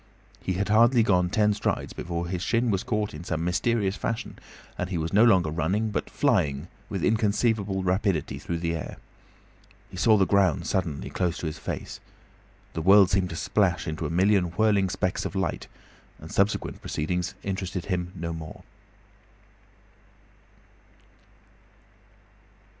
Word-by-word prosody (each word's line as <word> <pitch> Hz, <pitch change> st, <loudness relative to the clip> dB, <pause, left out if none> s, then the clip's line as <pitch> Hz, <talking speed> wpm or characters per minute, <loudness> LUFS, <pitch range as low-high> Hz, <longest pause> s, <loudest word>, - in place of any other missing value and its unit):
He 95 Hz, -, -2 dB
had 100 Hz, +3 st, -2 dB
hardly 115 Hz, +2 st, +5 dB
gone 90 Hz, -4 st, +2 dB
ten 105 Hz, +2 st, +2 dB
strides 105 Hz, -, -2 dB
before 85 Hz, 0 st, -4 dB
his 90 Hz, 0 st, -3 dB
shin 115 Hz, +3 st, +1 dB
was 95 Hz, -2 st, 0 dB
caught 105 Hz, -4 st, -2 dB
in 75 Hz, +3 st, -8 dB
some 85 Hz, -2 st, -2 dB
mysterious 100 Hz, +3 st, 0 dB
fashion, 115 Hz, -, -4 dB, 0.4 s
and 90 Hz, -, -3 dB
he 90 Hz, -, -2 dB
was 80 Hz, +2 st, -3 dB
no 105 Hz, +3 st, +6 dB
longer 95 Hz, -9 st, +4 dB
running, 95 Hz, +8 st, 0 dB
but -, -, -3 dB
flying 85 Hz, -, +1 dB, 0.2 s
with 95 Hz, -5 st, -3 dB
inconceivable 105 Hz, -3 st, +1 dB
rapidity 95 Hz, -3 st, 0 dB
through 85 Hz, -, -3 dB
the 85 Hz, 0 st, -2 dB
air. 80 Hz, -, -5 dB, 0.9 s
He -, -, -9 dB
saw 110 Hz, -2 st, +5 dB
the 95 Hz, -, +4 dB
ground 95 Hz, -6 st, +2 dB
suddenly 80 Hz, -7 st, -2 dB
close 90 Hz, -2 st, -1 dB
to -, -, -6 dB
his 75 Hz, -, -4 dB
face. -, -, -5 dB, 0.7 s
The 80 Hz, -, -3 dB
world 95 Hz, +2 st, +6 dB
seemed 95 Hz, -1 st, +1 dB
to 80 Hz, -, -6 dB
splash 95 Hz, -2 st, 0 dB
into 80 Hz, 0 st, -3 dB
a -, -, -5 dB
million 95 Hz, +2 st, +3 dB
whirling 100 Hz, +2 st, +2 dB
specks 95 Hz, -1 st, -1 dB
of -, -, -5 dB
light, 95 Hz, -, -2 dB, 0.5 s
and -, -, -11 dB
subsequent 100 Hz, +2 st, 0 dB
proceedings 90 Hz, +3 st, -2 dB
interested 95 Hz, -2 st, -3 dB
him 90 Hz, -2 st, -2 dB
no 85 Hz, -1 st, -4 dB
more. 80 Hz, -1 st, -8 dB
95 Hz, 150 wpm, -26 LUFS, 85-105 Hz, 0.9 s, no